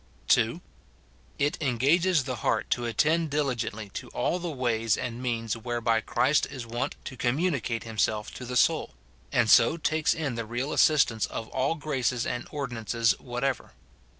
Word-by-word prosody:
[2.] -, -, +3 dB, 0.8 s
It 145 Hz, +2 st, 0 dB
engages 150 Hz, +6 st, +3 dB
the 130 Hz, -1 st, -4 dB
heart 110 Hz, -1 st, -1 dB
to 120 Hz, -, +1 dB
attend 155 Hz, +8 st, +2 dB
diligently 120 Hz, -7 st, -2 dB
to -, -, -7 dB
all 180 Hz, -, 0 dB
the 175 Hz, -1 st, -4 dB
ways 115 Hz, -6 st, 0 dB
and 125 Hz, -1 st, -4 dB
means 115 Hz, -3 st, -1 dB
whereby 115 Hz, -1 st, 0 dB
Christ 145 Hz, +6 st, +2 dB
is 125 Hz, -3 st, -7 dB
wont 120 Hz, +2 st, -3 dB
to -, -, -6 dB
commu 140 Hz, +10 st, +1 dB
nicate 115 Hz, -5 st, -2 dB
himself 110 Hz, -1 st, -1 dB
to -, -, -8 dB
the 125 Hz, +1 st, -2 dB
soul; -, -, +2 dB, 0.4 s
and 120 Hz, -2 st, +3 dB
so 120 Hz, +8 st, +6 dB
takes 155 Hz, -1 st, +1 dB
in 150 Hz, -5 st, -2 dB
the 115 Hz, -1 st, -4 dB
real 125 Hz, +6 st, -2 dB
as -, -, +4 dB
sistance 135 Hz, -8 st, +3 dB
of 110 Hz, -, -6 dB
all 135 Hz, +5 st, 0 dB
graces 130 Hz, -6 st, -1 dB
and 120 Hz, -, -3 dB
ordinances 115 Hz, -5 st, 0 dB
whatever. 125 Hz, +1 st, -3 dB
125 Hz, 165 wpm, -27 LUFS, 115-145 Hz, 0.8 s, so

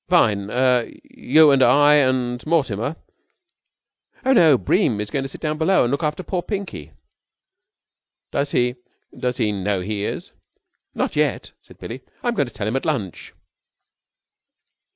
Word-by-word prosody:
"Fine! 105 Hz, -, +2 dB
Er 125 Hz, 0 st, +2 dB, 0.2 s
you 155 Hz, +2 st, +4 dB
and 135 Hz, -1 st, +3 dB
I 145 Hz, +4 st, +5 dB
and 125 Hz, -3 st, 0 dB
Mortimer?" 140 Hz, -4 st, 0 dB, 1.3 s
"Oh, 265 Hz, -, +4 dB
no, 160 Hz, -, +6 dB
Bream 150 Hz, -, +1 dB
is 105 Hz, 0 st, -4 dB
going 140 Hz, -, -1 dB
to 135 Hz, -, -5 dB
sit -, -, -11 dB
down 155 Hz, -1 st, -2 dB
below 190 Hz, +4 st, +3 dB
and 120 Hz, -, -1 dB
look 140 Hz, -, -1 dB
after 150 Hz, +3 st, -2 dB
poor 180 Hz, -1 st, -2 dB
Pinky." 200 Hz, 0 st, -6 dB, 1.4 s
"Does 140 Hz, 0 st, -1 dB
he 125 Hz, -1 st, 0 dB, 0.4 s
does 125 Hz, -1 st, -2 dB
he 105 Hz, -, 0 dB
know 100 Hz, -1 st, -2 dB
he 100 Hz, +2 st, -4 dB
is?" -, -, -5 dB, 0.6 s
"Not -, -, -2 dB
yet," -, -, -1 dB
said -, -, -18 dB
Billie. 125 Hz, +3 st, -8 dB, 0.2 s
"I'm 240 Hz, -, 0 dB
going 145 Hz, -, 0 dB
to 120 Hz, -, -12 dB
tell 100 Hz, -, -4 dB
him 110 Hz, -, -2 dB
at -, -, -4 dB
lunch." 115 Hz, -, -4 dB
130 Hz, 155 wpm, -21 LUFS, 115-155 Hz, 1.4 s, no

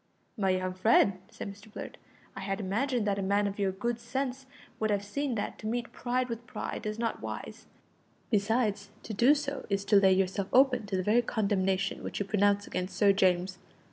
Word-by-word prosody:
"My 195 Hz, -5 st, 0 dB
young 185 Hz, 0 st, 0 dB
friend," 190 Hz, 0 st, +4 dB
said -, -, -7 dB
Mr 205 Hz, +2 st, -15 dB
Blurt, -, -, -8 dB, 0.4 s
"I -, -, -6 dB
had 195 Hz, 0 st, -3 dB
imagined 225 Hz, +4 st, 0 dB
that 200 Hz, -1 st, 0 dB
a -, -, -1 dB
man 200 Hz, +2 st, +2 dB
of 200 Hz, 0 st, -3 dB
your 195 Hz, -1 st, +1 dB
good 235 Hz, +5 st, -2 dB
sense 265 Hz, +2 st, -3 dB, 0.3 s
would 220 Hz, -, +1 dB
have 205 Hz, -1 st, 0 dB
seen 275 Hz, +4 st, -2 dB
that 205 Hz, -, -4 dB
to 215 Hz, -, -5 dB
meet 235 Hz, +1 st, -2 dB
pride 250 Hz, +1 st, -1 dB
with 235 Hz, 0 st, -6 dB
pride -, -, -5 dB
is 215 Hz, 0 st, -3 dB
not 230 Hz, 0 st, -2 dB
wise; -, -, -7 dB, 0.6 s
besides, 210 Hz, -1 st, +1 dB
to 220 Hz, -, -6 dB
do 245 Hz, +8 st, +5 dB
so 280 Hz, -2 st, -4 dB
is 200 Hz, 0 st, 0 dB
to 205 Hz, -, +5 dB
lay 190 Hz, -1 st, +6 dB
yourself 190 Hz, +1 st, 0 dB
open 250 Hz, -4 st, +4 dB
to 195 Hz, -2 st, -1 dB
the 185 Hz, -, -1 dB
very 220 Hz, +5 st, +4 dB
condemnation 195 Hz, -4 st, 0 dB
which -, -, -5 dB
you 205 Hz, -, -1 dB
pronounce 200 Hz, 0 st, +2 dB
against 185 Hz, +1 st, -4 dB
Sir 200 Hz, -1 st, +5 dB
James. 185 Hz, -1 st, +1 dB
205 Hz, 205 wpm, -30 LUFS, 195-235 Hz, 0.6 s, lay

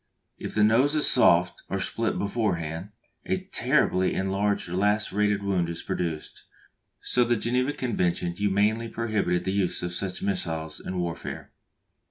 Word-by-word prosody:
If -, -, -5 dB
the 105 Hz, -, +4 dB
nose 125 Hz, +8 st, +4 dB
is 150 Hz, -, +3 dB
soft, 90 Hz, -7 st, +4 dB
or 95 Hz, -, -1 dB
split 115 Hz, +4 st, -1 dB
beforehand, 95 Hz, -5 st, -2 dB, 0.4 s
a 190 Hz, 0 st, +1 dB
terribly 125 Hz, -, +1 dB
enlarged 100 Hz, +1 st, 0 dB
and 90 Hz, +2 st, -2 dB
lacerated 105 Hz, 0 st, +1 dB
wound 95 Hz, -4 st, 0 dB
is 85 Hz, -, -5 dB
produced; 80 Hz, -3 st, -4 dB, 0.6 s
so 125 Hz, -, +2 dB
the 120 Hz, 0 st, +2 dB
Geneva 125 Hz, +5 st, 0 dB
Convention 90 Hz, -10 st, -1 dB
humanely 105 Hz, +5 st, +1 dB
prohibited 105 Hz, -7 st, -1 dB
the 95 Hz, -, 0 dB
use 95 Hz, -3 st, 0 dB
of 90 Hz, 0 st, -3 dB
such 95 Hz, +1 st, -4 dB
missiles 80 Hz, -5 st, -2 dB
in 90 Hz, -, -5 dB
warfare. 85 Hz, -2 st, -5 dB
100 Hz, 145 wpm, -26 LUFS, 90-115 Hz, 0.6 s, the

